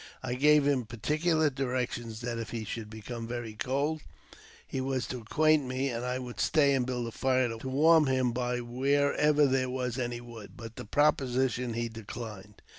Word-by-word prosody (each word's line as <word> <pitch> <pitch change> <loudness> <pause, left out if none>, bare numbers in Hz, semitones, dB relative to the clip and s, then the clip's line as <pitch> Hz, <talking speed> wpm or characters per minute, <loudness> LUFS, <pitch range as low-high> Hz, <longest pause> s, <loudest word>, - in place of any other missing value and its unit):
I 125 -1 -2
gave 150 +2 +5
him 135 -5 +1
particular 155 +7 +1
directions 125 -4 -3
that 120 -1 -3
if 115 - -5
he 115 -2 -4
should 110 +1 -5
become 115 +2 -7
very 120 -2 -5
cold 140 +7 -1 0.6
he 130 - -3
was 130 -1 -1
to 125 - -5
acquaint 150 +5 +2
me, 130 +2 -1
and 120 -1 -3
I 125 0 -1
would 125 -2 -7
stay 145 -3 +4
and 130 -2 +1
build 125 -2 -2
up 115 - -6
a - - -14
fire 130 -2 +2
to 120 +4 -6
warm 155 +3 +5
him 130 -2 +2
by 125 0 -1
wherever 145 +4 +2
there 130 -1 +1
was 125 -1 -2
any 120 -1 -2
wood; 115 -3 -11
but 115 -1 -9
the - - -7
proposition 125 -2 +1
he 120 0 -1
declined. 110 -2 -9
125 Hz, 190 wpm, -30 LUFS, 120-140 Hz, 0.6 s, gave